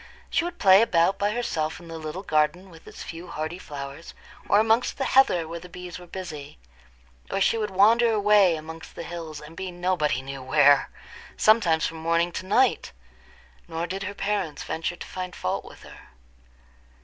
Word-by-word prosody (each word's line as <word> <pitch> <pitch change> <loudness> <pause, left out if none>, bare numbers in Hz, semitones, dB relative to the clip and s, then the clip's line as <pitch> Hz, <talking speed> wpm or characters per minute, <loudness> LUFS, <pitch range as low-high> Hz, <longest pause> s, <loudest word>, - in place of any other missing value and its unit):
She - - +2
would 350 0 -5
play 195 - +7
about 185 -3 +2
by 205 - +2
herself 165 -9 -2
in 170 - -13
the 165 -1 -7
little 155 +5 -6
garden 160 +3 0
with 165 -1 -16
its - - -9
few 170 +2 -8
hardy 160 +1 -5
flowers, 140 +1 -8 0.3
or 205 - +5
amongst 225 +2 +2
the 270 - -1
heather 220 -13 +4
where 170 +1 -6
the 180 +2 -12
bees 180 0 -8
were 180 - -13
busy; 165 - -8 0.7
or - - -1
she 195 - +3
would 215 -2 -1
wander 225 +5 +4
away 205 -4 +4
amongst 160 +1 -9
the - - -6
hills, 165 -3 -7
and 150 +2 -12
be 190 +2 -5
nobody 175 -7 0
knew 135 0 -7
where, 140 +1 +4 0.5
sometimes 200 -8 +4
from 165 - -4
morning 165 +2 +1
to 185 - -6
night; 250 - +2 0.7
nor 165 +1 -3
did 190 +3 -5
her 200 +1 -5
parents 195 -7 -2
venture 165 +2 -3
to - - -9
find 185 -1 -6
fault 90 - -2
with - - -14
her. - - -14
175 Hz, 185 wpm, -25 LUFS, 160-200 Hz, 0.7 s, play